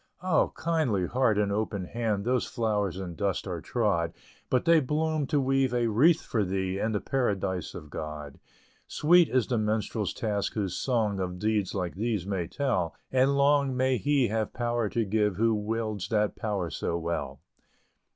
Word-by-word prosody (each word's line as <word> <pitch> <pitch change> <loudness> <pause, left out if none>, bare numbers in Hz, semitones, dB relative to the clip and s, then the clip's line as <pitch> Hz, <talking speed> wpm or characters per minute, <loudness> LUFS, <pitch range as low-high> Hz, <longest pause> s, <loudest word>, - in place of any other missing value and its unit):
Oh! 185 -4 +2
kindly 155 - +1
heart 120 -1 +2
and 105 -1 +1
open 100 -2 -2
hand 110 -1 -2
Those 125 +1 +1
flowers 105 -6 -1
in 95 -3 -5
dust 100 +1 -1
are 90 -4 -4
trod, 90 -8 0 0.4
But 125 - +1
they 165 -1 +6
bloom 155 +1 0
to 150 0 +1
weave 135 -1 +1
a 120 -1 +2
wreath 155 +10 +4
for 110 -3 0
thee, 95 0 -2
In 110 - 0
the 105 - 0
Paradise 95 -6 -1
of 75 -1 -9
God. 75 -2 -6 0.5
Sweet 175 +2 +4
is 130 -3 +2
the 120 -3 0
Minstrel's 105 -2 -1
task, 105 -3 -1
whose 100 -4 -2
song 110 -6 0
Of 90 -1 -3
deeds 105 -1 0
like 90 -3 -2
these 105 -2 -2
may 95 -4 -2
tell; 95 - -1 0.2
And 130 +2 +3
long 140 -2 +3
may 130 0 +2
he 140 -3 +2
have 110 0 -1
power 120 -2 -1
to 115 +1 0
give, 105 -1 +1
Who 115 +3 +2
wields 110 -1 -2
that 105 -2 +1
power 100 -6 -2
so 85 - -2
well! 85 0 -3
110 Hz, 175 wpm, -28 LUFS, 95-130 Hz, 0.5 s, they